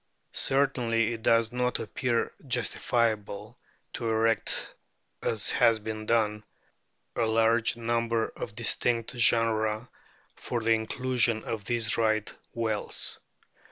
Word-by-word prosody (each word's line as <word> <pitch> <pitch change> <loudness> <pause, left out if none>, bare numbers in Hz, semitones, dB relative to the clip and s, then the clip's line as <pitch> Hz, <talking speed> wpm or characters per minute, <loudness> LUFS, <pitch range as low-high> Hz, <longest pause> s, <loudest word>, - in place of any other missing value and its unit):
Cer 135 +1 +3
tainly 115 -4 0
it 115 -1 -5
does 115 0 +3
not 125 0 0
appear 120 +2 -1 0.2
justifiable 115 -3 -1 0.3
to 115 -2 -3
erect, 115 0 +1 0.5
as 110 -2 +1
has 115 -1 +4
been 110 0 -6
done, 105 -2 +1 0.7
a 115 - +1
large 115 +1 +3
number 115 -1 0
of 105 - -7
distinct 115 0 0
genera 115 -1 +2 0.5
for 120 - -3
the 115 +1 +1
inclusion 120 0 0
of 110 -3 -4
these 115 -2 +1
Right 110 -2 +1 0.2
whales. 110 -2 -2
115 Hz, 115 wpm, -28 LUFS, 110-120 Hz, 0.7 s, has